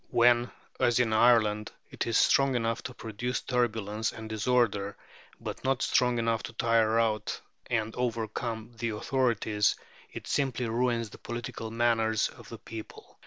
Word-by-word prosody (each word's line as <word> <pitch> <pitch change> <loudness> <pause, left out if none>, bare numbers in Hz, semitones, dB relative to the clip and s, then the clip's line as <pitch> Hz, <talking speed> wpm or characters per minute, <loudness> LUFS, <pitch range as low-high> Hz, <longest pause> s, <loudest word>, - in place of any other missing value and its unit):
When, 120 0 +4 0.3
as 120 0 +3
in 115 -3 +2
Ireland, 110 -2 +4 0.2
it - - -3
is 115 - +2
strong 135 -1 +4
enough 115 -1 0
to 125 - -5
produce 120 +3 -3
turbulence 110 -3 -1
and 110 0 -8
disorder, 110 -2 +1 0.4
but - - -6
not 135 -1 +1
strong 125 -2 +2
enough 115 -1 +1
to 115 - -7
tire 115 -1 +3
out 110 -2 0 0.3
and 110 -2 -1
overcome 115 -1 -3
the 115 - -1
authorities, 110 -4 +1 0.4
it - - -8
simply 130 -3 0
ruins 115 -1 0
the - - -12
political 120 -1 -5
manners 115 -1 +2
of - - -14
the - - -7
people. 110 -1 -10
115 Hz, 150 wpm, -29 LUFS, 110-120 Hz, 0.4 s, When